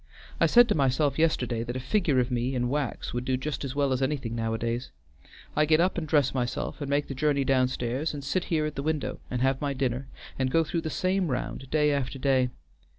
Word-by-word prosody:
I - - +5
said 240 0 +7
to - - +4
myself 140 +1 +1
yesterday 125 -8 +1
that 120 +1 -4
a - - -2
figure 145 0 +1
of 125 +1 0
me 125 +2 -1
in 125 -1 0
wax 145 +1 -2
would 120 0 -2
do 130 0 0
just 145 +3 -4
as 135 -1 -4
well 140 -2 +2
as 130 - -1
anything 130 -4 -1
nowadays. 115 +2 -2 0.7
I 150 - +4
get 155 +1 +4
up 180 +2 +2
and 165 -3 -3
dress 145 -3 +3
myself, 125 +3 -3
and 140 - -3
make 145 +1 +1
the - - -4
journey 140 0 +1
downstairs, 130 +2 0
and 145 -2 -6
sit 175 +7 -1
here 155 -3 0
at 150 - -3
the 140 - -4
window 155 0 -2
and 125 0 -1
have 135 0 +1
my 140 -1 -1
dinner 130 0 -1 0.3
and 130 -1 +1
go 165 +5 +3
through 165 +1 -2
the 160 - -3
same 185 +3 0
round 130 0 -4
day 150 0 +3
after 140 -1 -1
day. 130 -1 +2
135 Hz, 230 wpm, -27 LUFS, 125-150 Hz, 0.7 s, said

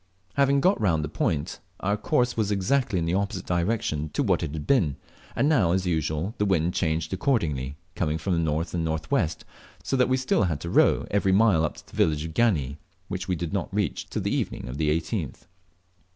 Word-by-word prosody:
Having 140 0 +3
got 185 - +3
round 85 -7 +2
the 75 - -3
point 75 -1 -1 0.2
our 100 +2 +1
course 125 +3 +1
was 110 -3 0
exactly 105 +3 +1
in 85 - 0
the 85 - 0
opposite 95 -1 -1
direction 85 -4 -1
to - - +1
what - - +2
it - - -3
had 75 -1 -5
been, 95 - +2 0.4
and 140 - +2
now, 110 - +3
as 95 0 0
usual, 80 +3 -1
the 105 - +2
wind 90 -3 +1
changed 80 -2 -1
accordingly, 80 - 0 0.2
coming 80 -2 -1
from 90 +4 -1
the 85 - +1
north 80 +1 -1
and 85 -2 -1
north 80 -1 -3
west, 80 0 0 0.4
so - - -1
that 125 -1 +3
we 130 - +3
still 130 -5 +2
had 80 -5 -1
to 85 - -5
row - - +4
every 100 -1 +2
mile 100 -5 +4
up 80 - -1
to - - -13
the - - -15
village 75 0 +2
of 80 - -6
Gani, 75 - +1 0.3
which 95 - -4
we 90 - 0
did 85 0 -4
not 95 -4 -2
reach 100 -4 -2
till - - -3
the - - 0
evening - - -2
of 65 +4 -6
the 75 -1 +2
18th. 80 - -2
90 Hz, 220 wpm, -26 LUFS, 80-105 Hz, 0.4 s, row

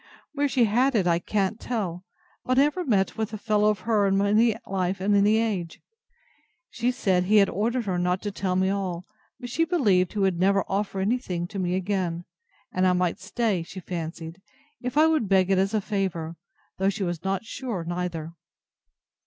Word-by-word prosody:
Where 290 0 +1
she 260 -3 +3
had 245 +5 +2
it, 200 -5 +2
I 170 -1 +2
can't 200 +3 -1
tell; 190 -7 -3 0.4
but 255 0 0
I 275 - +7
never 300 +5 0
met 210 - +1
with 220 -1 -1
the 215 - -6
fellow 210 0 +2
of 210 -3 -1
her 210 -1 +2
in 195 0 +2
any 210 +3 +3
life, 190 -1 -1
at 195 +2 0
any 205 +2 +4
age. 200 -7 -2 0.9
She 240 +1 0
said, 185 -7 +1
he 210 +4 +2
had 200 -1 +5
ordered 230 +4 -1
her 185 -3 -1
not 180 +1 +1
to 205 - -2
tell 190 -2 -2
me 190 +1 +2
all: 185 -3 -3 0.3
but 245 -1 -7
she 330 - +2
believed 210 - +2
he - - -6
would 190 -3 +1
never 195 +1 +3
offer 195 -1 -2
any 225 +6 +1
thing 175 -8 -4
to 200 - -5
me 180 -1 0
again; 185 -3 -2 0.5
and 185 0 +2
I 180 - +4
might 180 -1 0
stay, 200 -1 -1
she 175 +3 -8
fancied, 165 0 -6 0.4
if 250 +3 -4
I 310 - +7
would 310 -11 +1
beg 190 -1 +3
it 190 - +3
as 195 +3 +1
a 215 - +1
favour; 185 -6 -3 0.4
though 190 +1 +3
she 200 0 -3
was 175 -2 -3
not 195 +2 -2
sure 230 -7 -4
neither. 170 -2 -4
195 Hz, 200 wpm, -25 LUFS, 180-220 Hz, 0.9 s, I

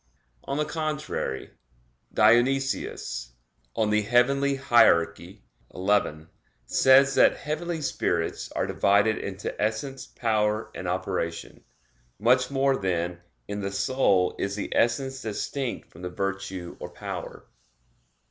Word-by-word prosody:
On 140 - -2
the 150 - +1
contrary, 150 - -3 0.6
Dionysius 120 - +1 0.4
(Coel. 110 -1 +1
Hier. 125 -3 +4
xi) 95 +4 -14 1.2
says 135 - +5
that - - +5
"heavenly 160 +2 -3
spirits 85 -11 -1
are - - 0
divided 100 +2 +2
into 95 0 -5
essence, 115 +6 -2
power, 110 -1 0
and 90 - -6
operation." 90 -2 -3 0.5
Much 125 +4 +3
more, 135 0 +2
then, 85 -2 -2 0.3
in 100 0 -4
the 100 0 -3
soul 100 -3 +2
is 100 0 -2
the 105 - -4
essence 130 +3 +1
distinct 120 +4 -4
from 80 - -14
the 90 - -4
virtue 95 -1 -4
or - - -6
power. - - -7
110 Hz, 110 wpm, -26 LUFS, 95-135 Hz, 1.2 s, says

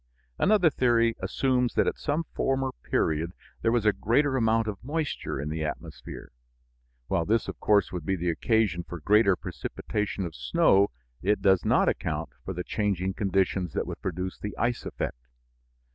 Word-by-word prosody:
Another 195 -6 +4
theory 115 -3 +3
assumes 125 -2 0
that - - +3
at - - -1
some 155 +2 0
former 135 -1 0
period 80 +3 0 0.3
there 115 - +2
was 120 -2 +1
a 105 - +5
greater 130 +8 +2
amount 115 -2 +2
of 105 -2 -5
moisture 150 - -3
in 75 +2 -3
the 80 0 -2
atmosphere; 75 -4 -7 0.8
while 85 - +1
this 110 +6 +1
of - - -6
course 105 -3 +3
would 90 -3 -4
be 95 +5 0
the 90 -1 0
occasion 105 +1 +1
for 85 0 -8
greater 100 +3 +4
precipitation 100 +1 -4
of 85 - -6
snow, 75 +10 +3 0.3
it 105 +3 +2
does 95 -3 +4
not - - +3
account - - -1
for - - -4
the 90 -1 -4
changing 95 -3 -1
conditions 95 -4 0
that - - -1
would - - -7
produce 90 0 -4
the 105 - -6
ice 120 0 -1
effect. - - -5
100 Hz, 170 wpm, -27 LUFS, 90-115 Hz, 0.8 s, a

